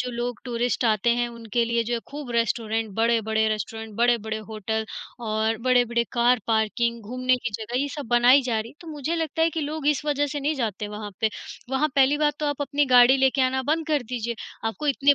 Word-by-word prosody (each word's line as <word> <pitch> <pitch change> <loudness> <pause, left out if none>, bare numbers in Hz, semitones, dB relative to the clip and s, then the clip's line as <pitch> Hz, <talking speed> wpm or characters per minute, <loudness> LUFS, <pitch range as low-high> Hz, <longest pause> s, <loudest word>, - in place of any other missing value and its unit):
जो 250 - -2
लोग 240 -1 -4
टूरिस्ट 245 0 -1
आते 220 +1 +2
हैं, 240 0 0
उनके 235 0 -2
लिए 235 0 +1
जो 240 +2 -1
है 230 - -2
खूब 285 -3 -7
रेस्टोरेंट 225 -1 0
बड़े-बड़े 220 -1 +2
रेस्टोरेंट 220 0 -4
बड़े-बड़े 230 -2 +1
होटल 220 +1 -3 0.4
और 220 +1 0
बड़े-बड़े 245 -2 +2
कार 240 -1 +3
पार्किंग, 230 +1 0
घूमने 255 +3 0
की 245 -1 -4
जगह 220 +4 -3
ये 285 - -1
सब 285 - -5
बनाई 245 +3 +6
जा 235 -3 0
रही 230 +2 -7
है। - - -19
तो 335 - -11
मुझे 305 +1 -3
लगता 320 0 -1
है 330 - +3
कि 320 0 -3
लोग 300 0 -4
इस 300 0 +1
वजह 290 -1 +1
से 290 0 -4
नहीं 300 +3 0
जाते 215 -5 -3
वहाँ 210 0 -6
पे। 220 -1 +2 0.4
वहाँ 270 +3 +1
पहली 280 +2 +4
बात 295 -1 +2
तो 300 - 0
आप 290 0 -2
अपनी 285 +1 +1
गाड़ी 250 +1 +7
लेके 265 0 +2
आना 260 0 +1
बंद 315 +3 0
कर 300 -3 +1
दीजिए, 235 -1 -2 0.3
आपको 225 +7 -3
इतने 285 0 +4
240 Hz, 220 wpm, -25 LUFS, 225-280 Hz, 0.4 s, गाड़ी